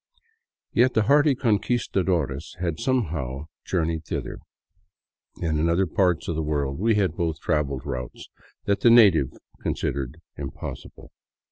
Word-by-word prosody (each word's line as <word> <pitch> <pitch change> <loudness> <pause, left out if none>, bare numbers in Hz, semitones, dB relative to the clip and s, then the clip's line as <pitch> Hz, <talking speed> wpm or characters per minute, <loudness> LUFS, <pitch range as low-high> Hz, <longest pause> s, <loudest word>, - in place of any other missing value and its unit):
Yet 125 +2 +3
the 110 - +4
hardy 145 +4 +4
Conquistadores 95 - 0
had 85 -3 -2
somehow 75 - -1 0.2
journeyed 80 -3 -1
thither, - - -4 1.0
and 80 -3 -1
in 80 +2 +2
other 90 +3 +2
parts 90 -1 +1
of 85 - -1
the 80 - -1
world 70 -2 -1
we 110 +2 +3
had 95 -6 +1
both 80 -3 -2
traveled 70 -5 -1
routes 65 -1 -6 0.4
that 100 -1 +1
the 120 - +5
natives 100 - +5 0.2
considered 65 -3 -3
" - - -45
impossible." 70 -2 -8
85 Hz, 135 wpm, -25 LUFS, 75-105 Hz, 1.0 s, the